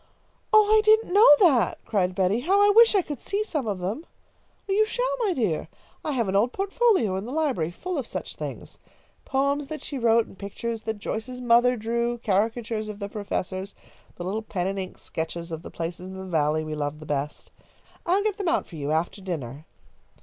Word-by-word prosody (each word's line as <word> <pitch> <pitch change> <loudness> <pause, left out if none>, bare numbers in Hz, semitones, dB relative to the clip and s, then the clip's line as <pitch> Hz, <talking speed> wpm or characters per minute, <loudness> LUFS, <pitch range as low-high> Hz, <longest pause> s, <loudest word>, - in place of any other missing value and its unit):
"Oh, 430 -1 +7
I 435 - +6
didn't 435 -3 +4
know 415 +3 +7
that!" 260 - +4
cried 185 -4 0
Betty. 190 +4 +2
"How 370 +10 +2
I 410 0 +6
wish 455 +1 +6
I 385 - +4
could 290 -6 -6
see 405 +2 -1
some 300 - -3
of 200 -3 -1
them!" 200 - -4 0.6
"You 405 +2 +3
shall, - - -1
my 440 -5 +1
dear! 175 - -1 0.4
I 300 - -2
have 235 -5 0
an 190 - -1
old 220 +5 +3
portfolio 390 - +2
in 195 - -4
the 245 - -6
library, 275 - 0
full 345 - -4
of 250 - -5
such - - -6
things. - - -7 0.5
Poems 280 +1 0
that 310 -2 -6
she 280 - -4
wrote 230 -1 +4
and 190 - -16
pictures 225 +3 -4
that 220 -1 -4
Joyce's 235 +4 -5
mother 245 0 +4
drew; 235 +2 -1
caricatures 220 +1 -1
of 210 -1 -6
the 200 -1 -5
professors, 200 -2 -4 0.4
the 175 - -7
little 200 +5 -2
pen 190 -5 -3
and 195 +1 -2
ink 185 - -6
sketches 170 +1 -5
of 160 -1 -5
the - - -9
places 170 +2 -5
in 190 - -8
the 190 - -6
Valley 155 -3 +1
we 155 0 -5
loved 150 0 -3
the 155 - -10
best. 145 0 -4 0.5
I'll 380 +3 +2
get 425 -1 0
them 380 -4 0
out 340 - +1
for 165 - -11
you, 145 0 -3
after 165 +5 -1
dinner. 150 -6 -5
225 Hz, 210 wpm, -25 LUFS, 185-310 Hz, 0.6 s, Oh